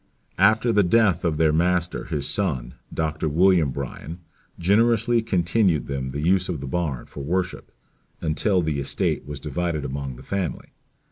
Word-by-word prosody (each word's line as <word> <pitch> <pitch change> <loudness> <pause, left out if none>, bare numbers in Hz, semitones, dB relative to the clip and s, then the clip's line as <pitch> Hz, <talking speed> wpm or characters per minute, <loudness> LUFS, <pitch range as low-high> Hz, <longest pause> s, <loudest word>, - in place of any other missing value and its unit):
"After 110 +4 +4
the 105 -2 +4
death 100 -2 +3
of 80 -3 0
their 80 -1 +3
master 85 +1 +1
his 75 -4 -2
son, 65 -12 -1 0.2
Dr. 80 0 -1
William 85 -1 +4
Bryan, 70 +5 -6 0.4
generously 115 +5 +3
continued 95 -4 +1
them 65 -1 -3
the 70 +3 -4
use 90 +3 +2
of 85 -5 -2
the 70 - -6
barn 70 -3 -2
for 70 - -8
worship, 90 +4 -2 0.5
until 90 +4 +1
the 75 -3 -1
estate 70 0 -1
was 75 -1 -6
divided 75 +2 -2
among 70 -1 -4
the - - -12
family. 95 -4 -3
85 Hz, 155 wpm, -24 LUFS, 70-95 Hz, 0.5 s, After